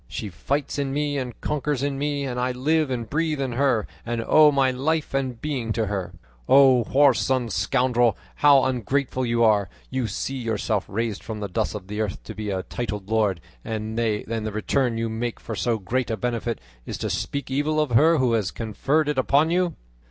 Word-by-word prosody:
She 105 - -5
fights 140 - -2
in 140 -1 -1
me 145 0 0
and 125 -3 -6
conquers 145 -2 -1
in 140 -1 -1
me, 145 0 -1
and 125 -2 -3
I 125 +1 0
live 150 +4 +1
and 120 -3 -3
breathe 155 +1 -1
in 135 -2 -1
her, 120 -4 +1 0.2
and 120 0 -3
owe 155 -1 +7
my 135 -2 +3
life 150 +5 -1
and 130 -3 -1
being 130 -6 -3
to 110 0 0
her. 100 -3 -3 0.4
O 130 -3 +6
whoreson 130 -3 +3
scoundrel, 120 +5 +2 0.2
how 140 -2 +6
ungrateful 130 +1 -1
you 115 0 +2
are, 105 -4 +3 0.2
you 130 -3 -1
see 135 +6 -3
yourself 110 -3 -1
raised 110 0 -2
from 110 -2 -6
the 105 - -3
dust 90 - -2
of 100 -3 -6
the 105 +2 -4
earth 105 -3 -3
to - - -8
be 105 -1 -5
a 95 -1 -2
titled 105 -3 -5
lord, 105 -6 +1 0.2
and 110 0 -4
the 110 -1 -1
return 115 +3 0
you 115 0 -1
make 115 +1 -3
for 115 - -6
so 115 +1 0
great 120 +5 -2
a 110 - -1
benefit 120 +1 -2 0.2
is - - -5
to - - -3
speak 140 -1 -3
evil 150 +3 +1
of 150 -4 0
her 160 +8 +5
who 130 -4 +2
has 105 -5 +1
conferred 135 +9 0
it 150 -2 0
upon 145 +5 +3
you!" 180 -1 +1
125 Hz, 200 wpm, -24 LUFS, 110-140 Hz, 0.4 s, owe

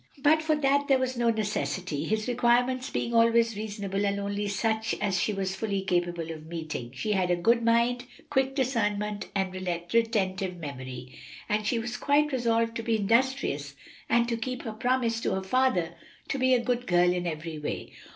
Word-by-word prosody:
But 300 +3 +4
for 315 0 +2
that 285 -1 +2
there 270 - +5
was 260 0 -1
no 235 -1 +2
necessity, 185 -7 -2
his 215 +3 -1
requirements 245 +1 +2
being 235 - -2
always 230 -1 +4
reasonable 205 -2 -3
and 200 0 0
only 200 +1 -2
such 220 +2 0
as 195 -3 0
she - - +1
was 190 -1 -2
fully 200 -3 -2
capable 175 -3 -1
of 155 -1 -9
meeting. 155 -7 -5
She 210 +11 -2
had 185 -3 +1
a 175 - +3
good 230 +7 +3
mind, 235 +2 +2 0.3
quick 270 -1 +1
discernment 210 -6 -1
and 190 -1 0
retentive 185 +1 -1
memory, 130 -4 -8 0.3
and 210 0 0
she 240 - +1
was 240 +1 -3
quite 295 +1 +2
resolved 230 -3 +1
to - - -3
be 225 0 +1
industrious 215 - +1 0.3
and 235 0 +3
to 235 -1 -1
keep 250 +2 -4
her 225 - -5
promise 235 -1 0
to - - 0
her 190 - -3
father 190 -6 +1 0.4
to 275 - -1
be 260 0 +4
a 240 - 0
good 245 0 -1
girl 175 0 +4
in 180 -1 -2
every 160 -1 -4
way. 150 - -5
215 Hz, 185 wpm, -28 LUFS, 185-240 Hz, 0.4 s, there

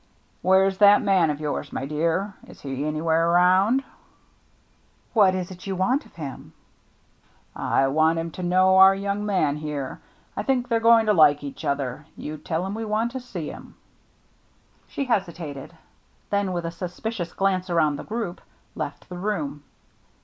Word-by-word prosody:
" - - -39
Where's 190 +1 +3
that 205 0 +7
man 190 -5 +3
of 150 -1 -2
yours, 150 -1 -3
my 135 - -4
dear? 165 +7 -1
Is - - -15
he 135 0 -4
anywhere 160 +2 +1
around? 185 +9 +4 0.4
" - - -38 0.2
" - - -38
What 200 -5 +5
is 185 0 -4
it 180 +1 -10
you 195 - -2
want 250 - 0
of - - -26
him? 145 -5 -8 0.3
" - - -38 0.2
" - - -37
I 135 - +1
want 155 +4 +2
him 165 0 -3
to 185 - -8
know 185 +1 +4
our 190 0 +8
young 200 +1 -2
man 155 -8 +1
here. 150 -3 -5 0.3
I - - -2
think 255 -3 0
they're 230 -2 +1
going 230 0 +5
to 210 - +3
like 150 -4 +5
each 140 - -7
other. 140 +1 -3
You 150 0 -6
tell 165 +3 -2
him 195 - -4
we 225 +1 -4
want 220 +2 -1
to 260 - -5
see 190 -11 -6
him." - - -12 1.1
She 280 - -3
hesitated; 170 - -3 0.5
then 200 -2 +1
with 175 -2 -3
a 165 - -3
suspicious 180 +2 -5
glance 190 -1 0
around 155 -4 +2
the - - -7
group 220 -5 -4 0.3
left - - -6
the 180 -1 -8
room. 160 -8 -3
180 Hz, 180 wpm, -24 LUFS, 155-200 Hz, 1.1 s, our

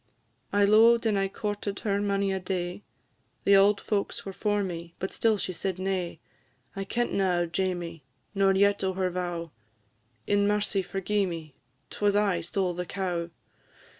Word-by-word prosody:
"I 205 0 +4
lo'ed 230 +3 +6
and 215 -2 +2
I 195 - +1
courted 205 0 -4
her 200 -1 0
mony 200 -1 +1
a 190 - -1
day, 180 0 -3 0.6
The 200 - +6
auld 200 +1 +5
folks 205 -2 -2
were 195 - -5
for 205 +1 0
me, 170 -2 -6
but 190 - -4
still 225 -2 +2
she 185 - -3
said 190 +1 -2
nay; 185 -3 -2 0.6
I 195 0 -3
kentna 195 -4 +1
o' - - +1
Jamie, 175 -2 -2 0.3
nor 195 -1 +4
yet 200 +1 +3
o' 190 0 0
her 185 -1 -1
vow; 175 -2 -3 0.7
In 205 0 +2
mercy 205 -1 +1
forgi'e 195 +1 -1
me, 160 -4 -6 0.4
'twas 205 -1 +1
I 200 -4 +2
stole 180 +2 -1
the 180 0 -4
cow! 175 -3 -2
195 Hz, 165 wpm, -28 LUFS, 180-205 Hz, 0.7 s, lo'ed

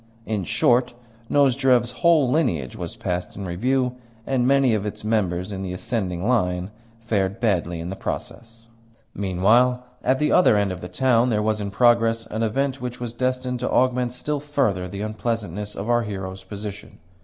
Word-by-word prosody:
In 105 -4 -2
short, 120 +3 +2 0.3
Nozdrev's 130 -3 +3
whole 165 -5 +5
lineage 110 - 0
was 90 +3 -6
passed 90 -6 -3
in 100 - -6
review; 125 +8 0 0.3
and 130 -2 +1
many 135 -3 +4
of 105 -2 0
its 105 0 -5
members 100 -4 0
in 95 -1 -4
the 95 -1 -4
ascending 90 -2 -2
line 90 -6 +1 0.3
fared 100 -4 -1
badly 90 -7 0
in 85 +2 -5
the - - -4
process. 115 +3 -6 0.5
Meanwhile, 110 +7 +2 0.2
at 130 +1 +2
the 150 +2 +1
other 180 -12 +5
end 100 -2 +1
of 90 - -6
the 90 - -6
town 125 -2 +2
there 105 -2 +1
was 110 0 0
in 100 - -3
progress 115 +1 +3
an 110 0 -4
event 135 +4 0
which 125 0 -5
was 120 -2 -5
destined 130 0 -1
to 125 - -2
augment 125 -1 +2
still 145 +4 -3
further 110 -11 -1
the 100 +2 -6
unpleasantness 105 -2 -3
of 100 - -5
our 120 0 +3
hero's 95 -3 -6
position. 105 +1 -8
115 Hz, 175 wpm, -23 LUFS, 95-125 Hz, 0.5 s, whole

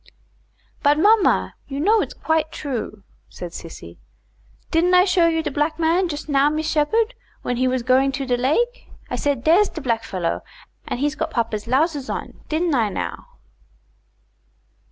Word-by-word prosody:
"But 290 0 +4
mamma, 415 +4 +3
you 275 0 -5
know 420 +8 +4
its - - -5
quite 320 -1 0
true," 235 -7 -5 0.3
said 175 -1 -8
Sissy. 160 - -10 0.7
"Didn't 355 +3 +3
I 360 +1 +6
show 360 -3 +3
you 325 -1 0
de 300 - -2
black 300 +2 0
man 335 +3 +2
just 295 -1 -5
now, 285 0 +3
Miss 310 +1 -2
Sheppard, 435 +11 +1 0.3
when 245 - -2
he 255 +1 +2
was 255 -1 0
going 260 +2 +3
to 270 0 -3
de 250 -1 +1
lake? 390 - 0 0.2
I - - 0
said 280 -4 -1
dere's 360 +6 +4
de - - -7
blackfellow, 225 - -2 0.5
and - - -3
he's 290 +1 0
got - - -3
papa's 225 -2 -2
lowsers 280 +2 +1
on, - - -5
didn't 320 +1 0
I 230 -5 +2
now?" - - -5
295 Hz, 165 wpm, -22 LUFS, 255-330 Hz, 0.7 s, I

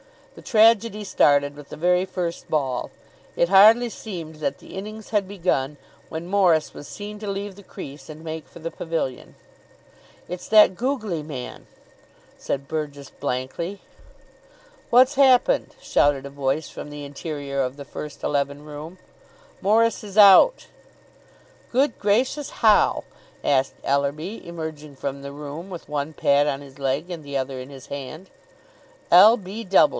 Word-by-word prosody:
The - - -13
tragedy 220 -1 +3
started 145 -6 +3
with 145 -1 -12
the - - -7
very 180 +3 +2
first 180 -2 -4
ball. 135 -5 -1 0.5
It 170 - +2
hardly 220 +5 +7
seemed 170 -9 -7
that 145 -2 -3
the - - -14
innings 215 +2 -7
had 205 -3 0
begun, 165 -8 -1 0.3
when 160 +1 -5
Morris 180 -5 +2
was 145 - -10
seen 210 0 -8
to 210 -1 -5
leave 200 0 -4
the 200 - -13
crease, 145 -5 -10
and 155 +1 -10
make 160 -1 -6
for - - -15
the 165 0 -5
pavilion. 160 -6 -4 0.9
"It's 180 0 -7
that 215 -3 +6
googly 220 - -2
man," 140 -5 -8 0.7
said 140 0 -4
Burgess 145 -2 -5
blankly. 165 +10 -4 1.1
"What's 255 +3 +6
happened?" 270 - +4
shouted 140 -2 +2
a - - -6
voice 140 +2 -2
from - - -8
the 145 0 -8
interior 140 -1 -4
of 130 +1 -3
the 140 - -8
first 150 +1 -8
eleven 140 0 -1
room. 155 +4 -9 0.6
"Morris 225 +3 +2
is 205 -1 -9
out." 210 - +7 1.1
"Good 260 +1 +1
gracious! 250 +8 +1 0.2
How?" 215 -1 +5 0.4
asked 135 -1 +1
Ellerby, 145 +9 -2
emerging 160 -3 -7
from 140 +1 -5
the 140 0 -8
room 150 +5 -8
with 175 -3 -9
one 150 +1 -3
pad 140 0 +3
on 140 -1 -2
his 140 -1 -14
leg 140 +6 -1
and 165 -3 -6
the 140 -1 -3
other 130 0 -3
in 130 +1 -9
his 135 -2 -12
hand. 140 +6 -8 0.8
"L. 210 +7 +8
160 Hz, 150 wpm, -23 LUFS, 140-200 Hz, 1.1 s, L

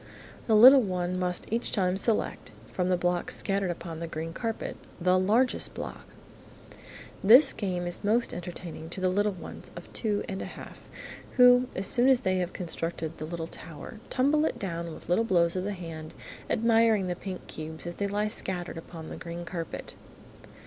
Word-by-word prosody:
The 220 - +4
little 260 +5 +10
one 185 -3 -2
must 180 -1 -2
each 235 - 0
time 185 -3 +2
select, 215 +3 0 0.2
from 180 -1 -1
the 180 - +3
blocks 175 0 0
scattered 195 -1 0
upon 170 -1 -5
the 170 - -4
green 160 +1 -5
carpet, 225 +4 -3 0.2
"the 185 +1 +3
largest" 225 +7 +1
block. - - -7 1.2
This 250 +8 +8
game 180 -4 -2
is 175 +3 -4
most 225 +4 +1
entertaining 175 -2 -7
to 175 - -5
the 185 0 +2
little 205 +3 +2
ones 185 - -9
of - - -11
two 225 - -3
years 205 - -1
and 190 -1 -4
a - - -4
half, - - -10 0.6
who, 250 0 +7
as 190 - -1
soon 245 +6 +4
as 260 -2 +5
they 185 -5 +1
have 180 -1 -1
constructed 165 -2 -4
the 155 - -4
little 165 0 -4
tower, 165 +5 -9
tumble 285 +4 +2
it - - -1
down 170 -3 -4
with - - -11
little 180 +6 +3
blows 170 -5 +2
of 185 0 -2
the 205 - -1
hand, 165 -4 -8 0.3
admiring 225 -3 +3
the 180 -1 -2
pink 185 0 -7
cubes 160 +1 -7
as 175 - -4
they 200 +3 -2
lie 205 +1 0
scattered 180 -5 -4
upon 165 -1 -9
the - - -7
green 170 0 -6
carpet. 170 -2 -6
185 Hz, 185 wpm, -28 LUFS, 170-215 Hz, 1.2 s, little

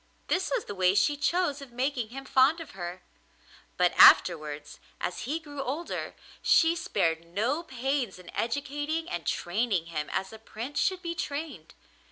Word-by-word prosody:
This 370 +1 +1
was - - -1
the - - -6
way 185 -1 +3
she 290 +8 +3
chose 290 0 0
of 275 -3 -10
making 250 -2 -1
him 270 +3 -8
fond 265 +6 +4
of 330 - -9
her; 180 -1 -7 0.7
but - - +3
afterwards, 150 -4 +5 0.2
as 180 - -3
he 315 +3 0
grew 290 -3 -7
older, 290 +6 -4 0.3
she 330 0 +4
spared 165 - 0
no 220 - -1
pains 265 - -2
in 180 -1 -12
educating 290 +6 -2
and 175 -4 -5
training 190 -1 0
him 150 -1 -3
as 190 +2 -2
a 220 - -10
prince 230 +5 -5
should 375 -1 0
be 340 -1 -2
trained. 315 -1 -5
265 Hz, 165 wpm, -28 LUFS, 190-300 Hz, 0.7 s, afterwards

